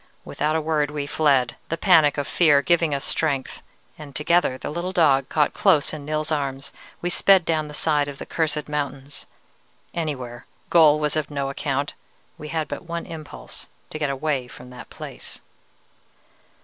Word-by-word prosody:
Without 155 +1 -1
a 160 - +1
word 150 -2 0
we 145 -1 -3
fled, 140 -5 +2
the 165 - -1
panic 160 -6 +5
of 145 - -1
fear 145 -5 +4
giving 165 +1 +2
us 140 - -3
strength, 140 -5 -1 0.4
and 145 -3 -10
together, 150 -3 +2
the - - -5
little 170 +3 -3
dog 145 -7 +3
caught 150 -2 +2
close 150 -1 +3
in 150 -2 -7
Nils's 155 +1 -2
arms, 140 -2 -3 0.3
we 175 - 0
sped 190 -1 +5
down 155 -2 0
the 150 - -9
side 150 -2 +1
of 140 -1 -7
the - - -7
cursed 155 -2 -1
mountains, 140 -1 -5 0.7
anywhere, 130 -8 -4 0.2
goal 155 -3 +6
was 150 -1 0
of 155 -2 -1
no 140 -2 -2
account: 140 0 -2 0.5
we 150 - -7
had 155 -1 -2
but - - -6
one 170 0 -4
impulse 155 -2 -9 0.2
to 155 - -5
get 150 -2 0
away 135 -2 -1
from 125 0 -12
that 125 - -11
place. - - -9
150 Hz, 175 wpm, -23 LUFS, 140-160 Hz, 0.7 s, goal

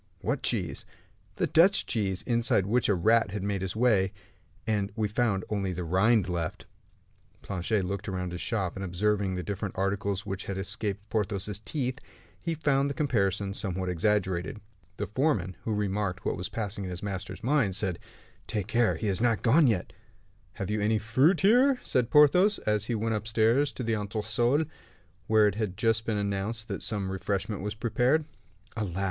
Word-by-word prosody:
"What - - -1
cheese?" - - -1 0.5
"The - - +1
Dutch 185 +5 +4
cheese, 95 -5 -1
inside 115 -5 +2
which 120 +4 +1
a 100 - +4
rat 110 +4 +3
had 100 0 -4
made 100 -1 -1
his 95 0 -3
way, 105 -5 +3 0.5
and 105 -3 0
we 110 -2 0
found 105 -3 0
only 100 -3 -1
the 90 0 -4
rind 95 +4 +3
left." 85 -3 -3 0.8
Planchet 95 +1 -1
looked 100 +2 -4
all 95 - -3
round 90 -1 -3
his 90 - -5
shop, 100 -7 -2
and 95 - -5
observing 95 +1 0
the 90 - -3
different 100 -1 -4
articles 100 +1 -1
which 95 0 -4
had 100 - -4
escaped 105 0 -3
Porthos's 105 -2 -1
teeth, 130 +2 -3 0.4
he 165 -1 -1
found 140 -2 +1
the 140 - -4
comparison 100 -8 0
somewhat 95 -2 -2
exaggerated. 95 +4 0 0.4
The 105 - -2
foreman, 105 - 0
who 115 - -1
remarked 100 -2 -1
what - - 0
was 90 0 -5
passing 100 -2 -4
in 95 - -4
his 90 +1 -6
master's 100 -1 -5
mind, 125 -7 +2
said, 95 -4 0 0.5
"Take 105 -4 -2
care; 115 +2 +2
he 110 - -3
is 100 +1 0
not 120 -2 +2
gone 140 +6 +5
yet." 105 -7 0 0.6
"Have 95 +1 -4
you 105 0 0
any 110 +1 +2
fruit 130 - +3
here?" 250 +7 +5
said 125 -2 0
Porthos, 180 +8 +6
as 105 -1 +1
he 120 - -1
went 110 +1 -1
upstairs 110 +6 +2
to 125 - -5
the 115 -1 0
entresol, 115 +7 0 0.6
where 110 -1 +5
it 105 - +1
had 105 -3 -3
just 115 -1 +1
been 110 -2 0
announced 100 +3 -2
that - - -4
some 100 -4 -2
refreshment 100 +1 -2
was 105 +1 -4
prepared. 125 +7 +1 0.5
"Alas!" 100 -6 -3
105 Hz, 180 wpm, -28 LUFS, 95-115 Hz, 0.8 s, Porthos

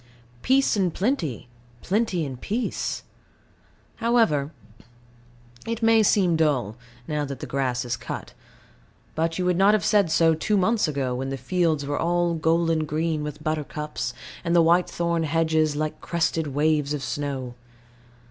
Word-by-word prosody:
Peace 270 0 +3
and 190 -4 +1
plenty, 185 - -1 0.4
plenty 195 -5 0
and 130 -3 -7
peace. 230 +4 -2 0.9
However, 225 -12 +2 1.2
it 230 0 -3
may 225 0 +5
seem 190 -4 +3
dull, 140 -9 +1 0.3
now 150 -1 -1
that 140 -1 -5
the - - -5
grass 130 -2 -1
is 120 -1 -2
cut; - - -7 0.8
but 165 +1 -1
you 180 - -1
would 180 -1 +2
not 200 +3 +5
have 215 - -1
said 205 -5 +3
so 165 0 +4
two 205 +6 0
months 215 +1 +2
ago, 135 -4 -1
when 130 +2 -3
the 135 - -3
fields 160 +1 0
were 145 +1 -2
all 175 0 +1
golden 165 0 +1
green 155 +1 -1
with 150 0 -6
buttercups, 150 -1 -3 0.3
and 170 0 0
the 170 - +6
whitethorn 170 0 +2
hedges 160 -1 +1
like 155 +1 -3
crested 165 -2 -1
waves 150 +1 +1
of 140 - -5
snow. 135 -4 -4
160 Hz, 145 wpm, -24 LUFS, 145-180 Hz, 1.2 s, the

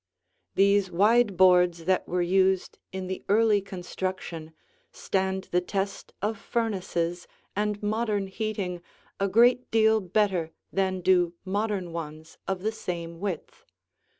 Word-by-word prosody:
These 200 0 +4
wide 210 +2 +3
boards 180 -2 +5
that 185 +1 +1
were 180 0 0
used 190 +1 +1
in 190 0 -4
the 185 0 -5
early 210 0 +4
construction 185 -3 -5 0.4
stand 190 0 -1
the 180 - +3
test 195 +2 -3
of 210 0 -1
furnaces 185 -7 -2 0.3
and 210 0 -1
modern 210 -1 0
heating 195 -3 -3 0.4
a 195 - +2
great 240 +5 +4
deal 220 0 +4
better 185 -4 0 0.2
than 190 -1 0
do 175 -1 +3
modern 195 -3 -2
ones 160 -1 -7
of 190 -1 -2
the 220 - +1
same 170 -5 -5
width. 190 -5 -5
190 Hz, 125 wpm, -27 LUFS, 180-210 Hz, 0.4 s, boards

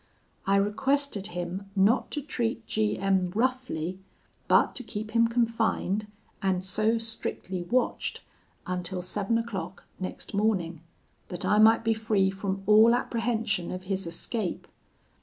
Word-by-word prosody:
I 195 - +4
requested 210 +2 +1
him 180 +2 -5
not 200 +6 +3
to 295 - -4
treat 235 -4 -2
G 215 -1 0
M 190 -2 +1
roughly, 225 -8 -1 0.5
but - - +4
to 255 - -4
keep 215 -1 -5
him 230 +1 +4
confined, 230 -3 0 0.3
and 190 -2 +1
so 215 +4 +1
strictly 220 -4 -2
watched, 245 +9 -1 0.4
until 180 0 -3
seven 205 +4 0
o'clock 200 -6 -5 0.2
next 185 +2 -6
morning, 190 -6 0 0.5
that 175 - -4
I 210 - +3
might 225 +1 +6
be 225 0 +3
free 215 -3 +1
from 195 0 -3
all 220 +3 +7
apprehension 225 -6 -1
of 185 0 -5
his 190 -1 -2
escape. 180 +3 -3
210 Hz, 135 wpm, -28 LUFS, 190-230 Hz, 0.5 s, all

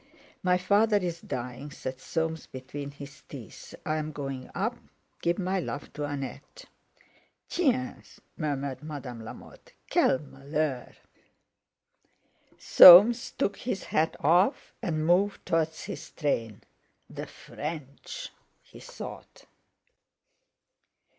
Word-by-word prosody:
_" - - -31 0.4
"My 180 -1 +3
father's 200 -2 +2
dying," 125 - -5
said 130 -2 -6
Soames 160 +2 -3
between 135 +2 -7
his 140 -1 -11
teeth. - - -10
"I'm 155 0 -1
going 135 -3 -6
up. 225 +6 -1 0.4
Give 170 +1 +1
my 190 0 0
love 145 -4 -6
to 150 - -3
Annette." 135 -2 -7 0.8
"Tiens!" 255 -7 -1 0.2
murmured 140 -4 -3
Madame 140 -7 -7
Lamotte; 110 - -12 0.2
"quel - - +4
malheur!" 140 -1 -3 1.6
Soames 210 +7 +9
took 200 - 0
his 200 -6 -3
hat 160 +1 0
off, 175 - +3
and 155 -8 -1
moved 190 +4 +2
towards 160 -2 0
his - - -7
train. 115 -9 -2 0.4
"The - - -7
French!" 155 - -7 0.3
he - - -15
thought. - - -10
155 Hz, 105 wpm, -28 LUFS, 140-185 Hz, 1.6 s, Soames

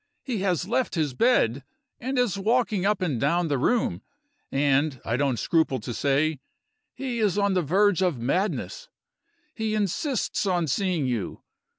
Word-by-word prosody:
He 245 -6 -3
has 185 -2 0
left 240 -1 0
his 155 -5 0
bed, 135 - +2 0.4
and 260 +2 -3
is 245 -7 +2
walking 210 -1 +1
up 205 -3 +1
and 145 -10 -1
down 165 +4 +1
the 140 - +1
room; 240 - +1 0.5
and, 140 0 +1
I 115 - 0
don't 135 -2 +1
scruple 150 +2 +1
to 120 - -6
say, 145 +3 +1 0.6
he 255 -3 -3
is 210 -3 +1
on 200 -1 +2
the 185 - +2
verge 190 +4 +2
of 180 -7 +1
madness. 195 - -2 0.6
He 220 -1 -2
insists 215 - -1
on 175 -3 +1
seeing 175 0 0
you. 120 -6 -3
180 Hz, 160 wpm, -25 LUFS, 140-210 Hz, 0.6 s, bed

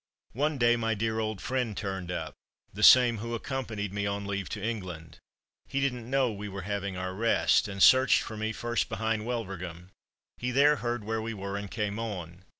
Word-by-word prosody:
One 145 +5 0
day, 120 -1 +4
my 115 -1 0
dear 110 +1 -1
old 110 -3 -2
friend 125 -4 -2
turned 95 -3 -4
up, 80 -4 -4 0.4
the 105 - -6
same 120 0 +7
who 115 +2 -3
accompanied 110 -6 -4
me 100 0 -1
on 100 0 -3
leave 100 -1 -3
to 105 - -4
England. 95 -7 -5 0.5
He 135 - -2
didn't 125 -4 -2
know 135 -2 +2
we 105 0 -6
were 100 -1 -6
having 100 -1 -3
our 95 0 -3
rest, 115 +1 +3
and 100 -1 0
searched 130 0 +6
for 110 - -7
me 110 +1 -2
first 120 +1 -1
behind 110 0 -1
Wulverghem. 95 -7 -5 0.5
He 125 - -2
there 145 +4 +4
heard 120 -3 -2
where 110 +1 -2
we 115 0 -4
were, 100 0 -5
and 100 0 -5
came 105 0 -2
on. 90 -5 -6
110 Hz, 195 wpm, -29 LUFS, 100-120 Hz, 0.5 s, same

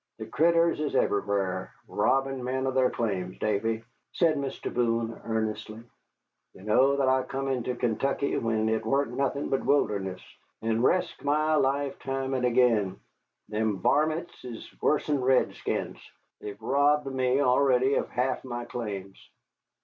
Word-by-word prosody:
The 110 - -6
critters 165 +7 +2
is 150 -2 -2
everywhar, 100 -2 0 0.2
robbin' 135 -1 0
men 130 +1 -1
of 130 - -1
their 130 -1 +3
claims. 95 -5 -3
Davy," 110 +2 -1 0.3
said 165 -3 +3
Mr. 140 -2 -4
Boone, 115 -1 0
earnestly, 110 0 -3 0.7
"you 95 - -14
know 130 +6 +4
that 135 -1 +2
I 130 0 +3
come 135 +1 -4
into 125 -2 -1
Kaintuckee 135 +4 0
when 110 -1 0
it 110 0 0
waren't 135 +2 0
nothin' 140 +1 -1
but 135 - 0
wilderness, 100 -9 +1 0.4
and 115 0 +1
resked 180 +7 +1
my 155 +2 +2
life 140 -1 +1
time 135 0 -3
and 130 -1 0
again. 115 -6 +2 0.5
Them 105 -1 0
varmints 155 - 0
is 120 -3 -8
wuss'n 150 -2 +1
redskins, 130 0 0 0.4
they've 105 -1 -8
robbed 145 +2 +2
me 130 -1 +1
already 130 0 +3
of - - 0
half 125 +1 -1
my 120 -2 -5
claims." 100 -6 -6
125 Hz, 140 wpm, -27 LUFS, 110-140 Hz, 0.7 s, know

